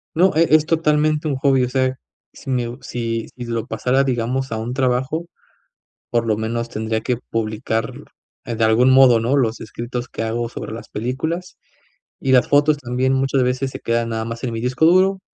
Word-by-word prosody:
No, 185 +4 +4
e 165 +1 +5
es 155 -1 +4
totalmente 155 -1 +1
un 145 -3 0
hobby, 135 -1 +3
o 125 - -3
sea, 130 0 0 0.4
si - - -8
me 120 -2 -1
si 115 -2 -3
si 125 - -7
lo 115 -1 -3
pasara, 130 +1 +1
digamos, 130 0 -1
a 110 - -1
un 115 +3 -4
trabajo, 130 +5 0 0.8
por 115 -1 +1
lo 110 - +2
menos 115 +2 -3
tendría 110 0 -2
que 125 +2 -1
publicar, 110 +1 -2 0.5
eh, 120 - -4
de 115 - -2
algún 115 +4 +4
modo, 130 -3 +7
¿no? 120 +5 +1
Los 115 -4 0
escritos 120 +3 -5
que - - -5
hago 115 +1 -2
sobre - - -7
las 115 - -8
películas, 160 +11 -4 0.6
y 130 - +1
las 125 - +4
fotos 145 +1 +4
también 130 0 -1
muchas 135 0 +1
veces 130 +2 -1
se - - -7
quedan 115 0 -1
nada 110 -1 -2
más 115 0 -6
en 125 - -2
mi 115 - -4
disco 125 +5 +1
duro. 190 +3 +4
125 Hz, 195 wpm, -20 LUFS, 115-135 Hz, 0.8 s, modo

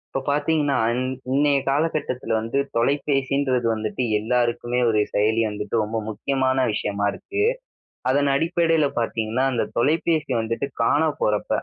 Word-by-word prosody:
இப்போ 135 - 0
பாத்தீங்கன்னா, 145 -1 +1 0.2
இன் 125 +1 -1 0.3
இன்னைய 145 0 +3
காலகட்டத்தில 140 -4 -1
வந்து 115 +5 -3 0.2
தொலைபேசின்றது 135 -1 +1
வந்துட்டு 110 +2 -3 0.2
எல்லாருக்குமே 120 +2 0
ஒரு 110 -1 +2
செயலி 110 +2 +2
வந்துட்டு 105 0 -4
ரொம்ப 110 +1 -3
முக்கியமான 130 +4 0
விஷயமா 100 -1 -2
இருக்கு. 395 - -4 0.7
அதன் 140 +2 +2
அடிப்படைல 165 0 +2
பாத்தீங்கன்னா, 115 +1 -1
அந்த 120 - 0
தொலைபேசி 155 +2 +1
வந்துட்டு 115 +4 -2
காணா 145 +7 +3
போறப்ப, 105 -1 0
130 Hz, 125 wpm, -23 LUFS, 115-145 Hz, 0.7 s, இன்னைய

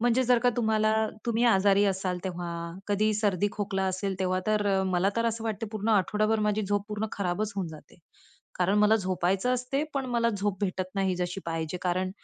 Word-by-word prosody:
म्हणजे 240 +2 +3
जर 250 0 +4
का 245 +1 +3
तुम्हाला 220 -2 +2 0.3
तुम्ही 235 0 +1
आजारी 200 -2 +4
असाल 190 -2 -1
तेव्हा, 175 -2 -4 0.4
कधी 215 +1 +2
सर्दी, 205 -2 +1
खोकला 195 -2 -2
असेल 190 0 -2
तेव्हा 185 0 0
तर 205 -2 +2
मला 185 +1 +2
तर 230 0 +1
असं 230 0 -2
वाटते 225 0 -3
पूर्ण 215 0 -3
आठवडाभर 215 +1 +2
माझी 210 0 +1
झोप 205 0 -1
पूर्ण 215 +1 -2
खराबच 200 +2 -2
होऊन 190 - -1
जाते. 155 +3 -13 0.6
कारण 190 +3 +2
मला 210 +1 +5
झोपायचं 185 +4 0
असते, 250 +3 -1
पण 270 -2 -1
मला 235 -1 +2
झोप 200 -1 -1
भेटत 185 -2 -2
नाही 195 -2 +1
जशी 180 +2 -3
पाहिजे, 165 +1 -3
कारण 185 +1 0
205 Hz, 185 wpm, -28 LUFS, 185-220 Hz, 0.6 s, मला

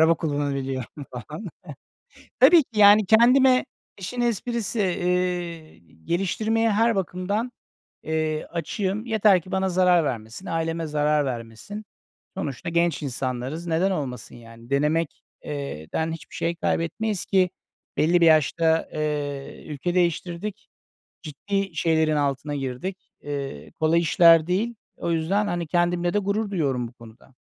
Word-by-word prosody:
Araba 160 +1 +6
kullanabiliyorum 140 -3 -3
falan. 150 - -8 0.9
Tabii 345 -3 +7
ki, 225 -5 -6
yani, 205 +1 +7
kendime 255 +5 +5 0.3
işin 225 +6 -4
esprisi, 235 -1 -1
eee, 180 -3 -1 0.3
geliştirmeye 220 - 0
her 225 +2 +3
bakımdan, 195 +5 -2 0.5
eee, 155 -1 -1
açığım. 190 +5 -3
Yeter 215 -5 +4
ki 185 - -13
bana 190 0 +1
zarar 180 -1 +4
vermesin, 115 - -5
aileme 165 0 -2
zarar 150 0 +1
vermesin. 120 - -6 0.5
Sonuçta 145 +5 -4
genç 170 -1 +1
insanlarız. 130 +4 -4
Neden 170 +4 +1
olmasın 135 -8 -4
yani? 115 0 -14
Denemek 150 +3 0 0.2
eee, 140 - -5
den 160 0 0
hiçbir 165 - -9
şey 170 +1 -1
kaybetmeyiz 185 +5 -1
ki 185 -2 +3 0.5
belli 170 +3 +3
bir - - +6
yaşta, 160 +1 +3
eee, 145 -2 -4
ülke 155 +4 -3
değiştirdik. 175 +3 -1 0.5
Ciddi 195 +6 -3
şeylerin 160 -2 +2
altına 145 0 -1
girdik. 140 +8 -5
Eee, 140 -1 -6
kolay 160 +1 +3
işler 165 -1 +6
değil. 215 +6 0 0.2
O 170 - -2
yüzden, 180 +6 +1
hani, 175 -3 -2
kendimle 175 +1 +1
de 205 - +3
gurur 205 +2 -1
duyuyorum 135 -9 -1
bu 115 - -15
konuda. 120 +2 -16
170 Hz, 130 wpm, -24 LUFS, 145-195 Hz, 0.9 s, Tabii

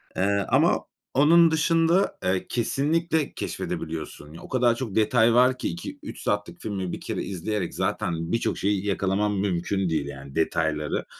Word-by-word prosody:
Eee, 100 +1 +1
ama - - +4 0.4
onun 165 +4 +6
dışında, 165 +3 +2
eee, 95 0 0
kesinlikle 155 +6 0
keşfedebiliyorsun. 80 -1 -5
O - - -12
kadar 120 -2 +3
çok 115 -5 -5
detay 115 +1 +4
var 125 +2 +4
ki - - -2
2-3 85 0 -7
saatlik 105 0 -2
filmi 95 -4 -3
1 - - -6
kere - - -3
izleyerek 95 0 -3
zaten 85 0 -2
birçok 115 - 0
şeyi 100 0 0
yakalamam 100 +1 0
mümkün 95 0 0
değil 80 -3 0
yani 70 -1 -9
detayları 80 -2 0
100 Hz, 145 wpm, -25 LUFS, 85-125 Hz, 0.4 s, onun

